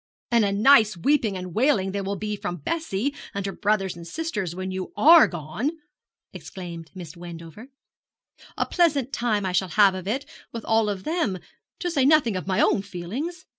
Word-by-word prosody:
'And 235 -2 +4
a 200 - +1
nice 215 -1 +5
weeping 220 - +1
and 180 -1 -7
wailing 220 - +2
there 200 0 -3
will 200 +1 -2
be 210 +2 -3
from 175 -3 -4
Bessie 285 -6 -1 0.2
and 200 -1 -3
her 195 - -2
brothers 200 -3 0
and 170 0 -10
sisters 210 - -4
when 185 +1 -4
you 185 0 -5
are 330 +2 +8
gone!' 170 - -3 0.6
exclaimed 170 -4 -8
Miss 175 -3 -9
Wendover; 170 +5 -10 0.9
'a - - +1
pleasant 290 -7 +1
time 215 -4 0
I 185 - -1
shall 185 +1 +1
have 200 0 +5
of 185 0 -6
it, 260 +7 -2 0.3
with 230 -1 -7
all 225 -1 +2
of 195 -2 -4
them 315 - -1 0.4
to 355 - -1
say 285 -5 +2
nothing 275 -7 +4
of 185 - -4
my 190 -1 0
own - - +3
feelings. 225 - -6
205 Hz, 185 wpm, -24 LUFS, 185-265 Hz, 0.9 s, are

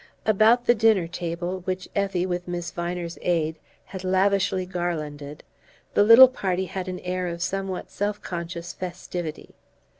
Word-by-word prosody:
About 220 +3 +4
the 240 - +6
dinner 220 -5 +3
table, 175 +1 -4
which 185 0 -3
Effie, 195 -3 0
with 180 -1 -3
Miss 175 -1 -4
Viner's 175 0 -4
aid, 160 -2 0 0.3
had 190 -1 -8
lavishly 190 0 +2
garlanded, 150 -5 -4 0.5
the - - +4
little 230 +5 +10
party 190 -7 -2
had 185 +1 -5
an 180 -1 -4
air 180 0 -2
of 170 0 -3
somewhat 190 0 -3
self 205 +1 -2
conscious 170 0 -6
festivity. 175 -3 -6
180 Hz, 145 wpm, -25 LUFS, 175-195 Hz, 0.5 s, little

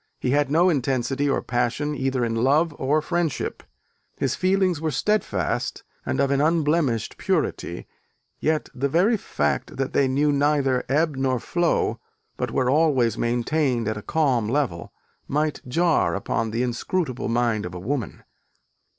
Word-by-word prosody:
He 125 - -1
had 145 0 +2
no 165 +5 +4
intensity 135 -2 0
or 135 - 0
passion, 125 +5 -1
either 130 -3 0
in 115 - -2
love 145 +8 +2
or 145 +3 +1
friendship: 170 -4 -2 0.6
his 135 -1 0
feelings 185 -2 +1
were 160 - 0
steadfast 145 - -1 0.2
and 65 - -1
of 140 - +2
an 140 0 +2
unblemished 150 -6 +1
purity, - - -1 0.5
yet 155 0 0
the 140 +2 -1
very 185 - +3
fact 210 - -2
that 135 0 -2
they 140 - +3
knew 145 +3 +2
neither 140 -3 +2
ebb 150 +2 +2
nor 130 -2 +1
flow, 175 +5 0 0.4
but - - -2
were 130 - 0
always 135 -6 +3
maintained 120 +1 0
at 110 - -1
a 105 - -6
calm 130 -6 +1
level, 120 - -1 0.4
might 150 +1 -1
jar 165 +5 +2
upon 110 +3 -1
the 115 +3 -1
inscrutable 130 +2 -2
mind 115 -2 +1
of 90 0 -6
a - - -5
woman. 120 +3 -4
135 Hz, 150 wpm, -24 LUFS, 120-155 Hz, 0.6 s, no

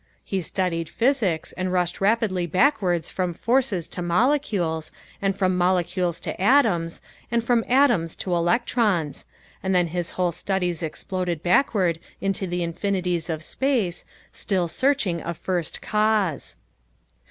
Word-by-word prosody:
He 195 -1 -1
studied 165 -2 -2
physics 230 - +1
and 185 0 -3
rushed 180 -1 0
rapidly 200 -4 +1
backwards 185 - +2
from 180 -2 -2
forces 230 -6 +1
to 180 - -5
molecules, 175 - +1 0.3
and 195 -1 +1
from 185 -2 +1
molecules 180 -1 +1
to - - -5
atoms, 195 -9 +3 0.3
and 235 0 +1
from 235 -1 +2
atoms 240 - +3
to 180 - -3
electrons, 180 - +1 0.4
and 190 0 0
then 180 -1 +4
his 175 0 -2
whole 180 -1 +2
studies 180 0 -2
exploded 175 +1 -3
backward 180 - +2 0.2
into 195 -1 -1
the 175 0 -2
infinities 180 -1 -1
of 160 -1 -3
space, 230 - 0 0.3
still 185 -4 -1
searching 185 - +1
a 170 - -4
first 175 -2 -3
cause. 210 -7 +1
185 Hz, 130 wpm, -24 LUFS, 170-215 Hz, 0.4 s, then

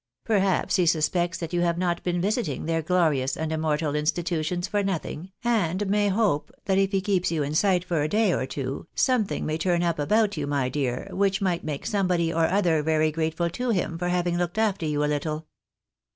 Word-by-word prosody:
Perhaps 195 -4 +2
he 180 -2 +2
suspects 170 +2 +1
that 170 0 -6
you 175 - +1
have 170 -1 +1
not 175 -1 0
been 175 -1 -1
visiting 195 - -1
their 165 0 0
glorious 155 -6 +1
and 160 0 -2
immortal 155 -1 0
institutions 170 +3 -1
for 205 +1 0
nothing, 185 -2 -4
and 205 -5 +1
may 205 +1 +2
hope 195 -7 +1
that 195 -1 +2
if 195 0 +2
he 195 -2 +1
keeps 185 -3 0
you 155 -3 0
in 145 +1 -3
sight 180 +1 +2
for 170 -4 -1
a 150 - +1
day 210 -1 +2
or 130 - -1
two, 135 +3 -5
something 250 -6 +1
may 155 +1 -2
turn 175 0 +1
up 170 -2 0
about 210 +5 +2
you, 145 -1 -2
my 140 -3 0
dear, 130 -2 -2
which 195 0 +1
might 185 -4 0
make 150 -3 -4
somebody 180 -5 +1
or 165 0 +2
other 175 -5 +2
very 155 0 +2
grateful 160 +2 -1
to 250 +8 -3
him 185 -6 0
for 175 +1 -2
having 175 -1 0
looked 175 +2 -2
after 205 -7 +1
you 150 -1 0
a - - +2
little." 155 +1 -2
170 Hz, 210 wpm, -25 LUFS, 155-190 Hz, -, Perhaps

